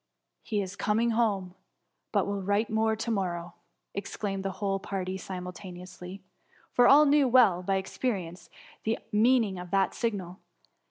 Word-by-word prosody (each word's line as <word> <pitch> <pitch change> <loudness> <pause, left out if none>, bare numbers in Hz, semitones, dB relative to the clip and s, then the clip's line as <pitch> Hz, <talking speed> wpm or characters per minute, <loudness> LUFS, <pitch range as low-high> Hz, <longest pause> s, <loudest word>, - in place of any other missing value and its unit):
'' - - -55
He 210 -2 -1
is 190 +1 -7
coming 220 +4 +1
home, 205 -6 0 0.6
but - - +2
will 200 0 -2
write 205 +4 0
more 220 0 +2
to 225 +2 -3
morrow,^ 175 -4 -2 0.4
exclaimed 200 -1 -4
the 195 - -1
whole 195 0 -1
party 190 -1 -4
simulta 185 0 -7
neously; 180 +1 -10 0.5
for 245 0 +5
all 295 +2 +8
knew 285 -1 +4
well 230 -8 +5
by 195 +2 0
experience, 190 -3 -3 0.3
the 220 +1 0
meaning 220 -3 +3
of 180 0 -8
that 195 +1 +2
signal. 195 -6 -3
195 Hz, 155 wpm, -28 LUFS, 185-220 Hz, 0.6 s, all